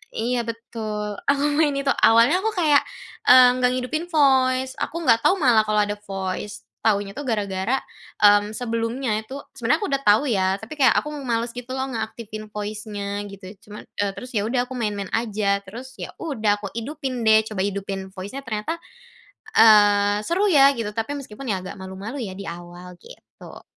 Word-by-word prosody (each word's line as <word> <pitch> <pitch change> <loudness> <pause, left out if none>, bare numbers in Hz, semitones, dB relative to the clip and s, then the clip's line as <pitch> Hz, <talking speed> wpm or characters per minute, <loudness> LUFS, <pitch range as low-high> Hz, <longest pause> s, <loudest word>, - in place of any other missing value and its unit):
iya 240 +2 0
betul. 215 -3 -5
Aku 280 0 +2 0.2
main 295 -3 +3
itu. 275 0 +1 0.2
Awalnya 230 +11 +5
aku 445 +1 0
kayak 305 -5 +4 0.5
eee, 255 0 +9
enggak 250 0 +3
ngidupin 310 +7 -2
voice, 260 -3 +3
aku 335 +2 -3
enggak 230 -4 +4
tahu 380 - +5
malah 230 -5 +5
kalau 210 0 +2
ada 205 0 -3
voice. 195 +1 -5 0.2
Tahunya 200 +1 +1
tuh 290 - -5
gara-gara, 210 +3 -1 0.4
mmm, 205 +1 +5
sebelumnya 230 0 -2
itu, 220 +5 -12 0.2
sebenarnya 240 - +1
aku 405 - -2
udah 275 0 0
tahu 210 +6 +5
ya, 190 -3 +2
tapi 265 +8 -9
kayak 260 -4 +5
aku 300 - -1
males 235 -2 -1
gitu 245 +1 -7
loh 265 0 -2
ngeaktifin 220 -1 -6
voice-nya 205 -1 -5
gitu. 195 -1 -12 0.2
Cuman, 210 - -9 0.2
eee, 200 -1 0
terus 250 - -8
ya 205 - 0
udah 245 +1 0
aku - - -6
main-main 205 -4 -3
aja. 210 -3 0
Terus, 250 +6 -10
ya - - -5
udah 220 -10 0
aku 200 - -5
idupin 265 0 -4
deh. 220 0 +7
Coba 205 -3 -3
hidupin 195 -1 -5
voice-nya 205 +8 -7
ternyata, 225 +9 -3 0.8
eee, 205 -1 +5
seru 385 +5 +2
ya 280 -2 +7
gitu. 210 -2 -3
Tapi 225 +6 -3
meskipun 255 0 -9
ya 185 -1 -2
agak 190 - -8
malu-malu 195 +8 -7
ya 190 -3 -6
di 200 - -7
awal, 175 +1 -9
gitu. - - -14
225 Hz, 175 wpm, -23 LUFS, 205-260 Hz, 0.8 s, eee